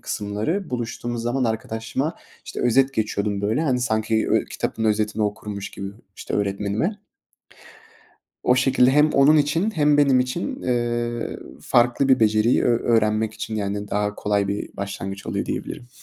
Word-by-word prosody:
kısımları 105 - -3
buluştuğumuz 120 -1 -3
zaman 125 +2 0
arkadaşıma, 115 +6 -2 0.3
işte, - - -6
özet 135 +3 +3
geçiyordum, 105 -2 -1
böyle. 110 +8 0
Hani, 130 -5 +1
sanki 110 -1 0
ö - - +3
kitabın 110 - -3
özetini 105 0 +1
okurmuş 105 -1 -4
gibi, 95 - -6 0.3
işte, - - -5
öğretmenime. 105 - -1 1.4
O 125 - +4
şekilde 130 -1 +4
hem 150 +3 +4
onun 140 +3 +6
için 155 +8 +2
hem 150 -6 +3
benim 135 -3 +5
için, 170 - -3
eee, 120 -1 -1 0.2
farklı 120 +3 +2
bir 130 -2 +4
beceriyi 110 +2 +3
ö 120 -1 +3 0.2
öğrenmek 110 0 +1
için, 110 - -5
yani, 100 0 -3
daha 105 0 -1
kolay 100 -1 0
bir 100 +1 -4
başlangıç 100 0 -5
oluyor, - - -2
diyebilirim. 120 - -5
115 Hz, 145 wpm, -23 LUFS, 105-130 Hz, 1.4 s, onun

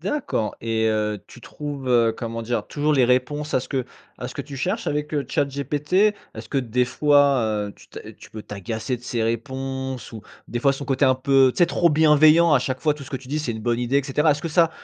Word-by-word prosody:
D'accord 195 - -2
et 110 -1 0
heu, 105 -1 -1
tu - - -15
trouves, 145 0 -7
heu, 115 -2 +4
comment 115 -1 -5
dire? 120 +1 -2
Toujours 150 +1 0
les 135 -3 +4
réponses 145 +4 0
à - - +3
ce - - -10
que 130 -2 -1 0.3
à 125 - -5
ce - - -10
que 140 - -4
tu 140 0 -10
cherches 190 - -2
avec, 150 +1 -2
heu, 145 - 0
ChatGPT? 140 +4 -2 0.4
Est-ce - - -9
que 140 - 0
des 125 -1 0
fois, 140 +1 +3 0.3
heu, - - -9
tu - - -19
t'a - - -10
tu - - -16
peux 110 -1 -8
t'agacer 110 +5 -4
de - - -22
ses 120 -2 -2
réponses 130 +3 -4
ou 110 - -7 0.3
des 120 - -4
fois 135 +3 +3
son 140 - -7
côté 135 0 +2
un 130 - +4
peu, 135 0 +4
tu - - -7
sais, 175 - +5
trop 170 - +2
bienveillant, 155 +1 +5
à 145 - +6
chaque 130 +1 -3
fois, 150 -2 +2
tout 150 - -10
ce - - -11
que 135 - -2
tu 130 0 -13
dis 150 +3 -1
c'est 150 -6 -2
une 110 -1 -7
bonne 120 0 0
idée 125 +3 0
et 140 - +3
cetera? 150 +2 +2
Est-ce 145 +2 -1
que 165 - -2
ça, 165 +1 +3
135 Hz, 255 wpm, -23 LUFS, 120-150 Hz, 0.4 s, à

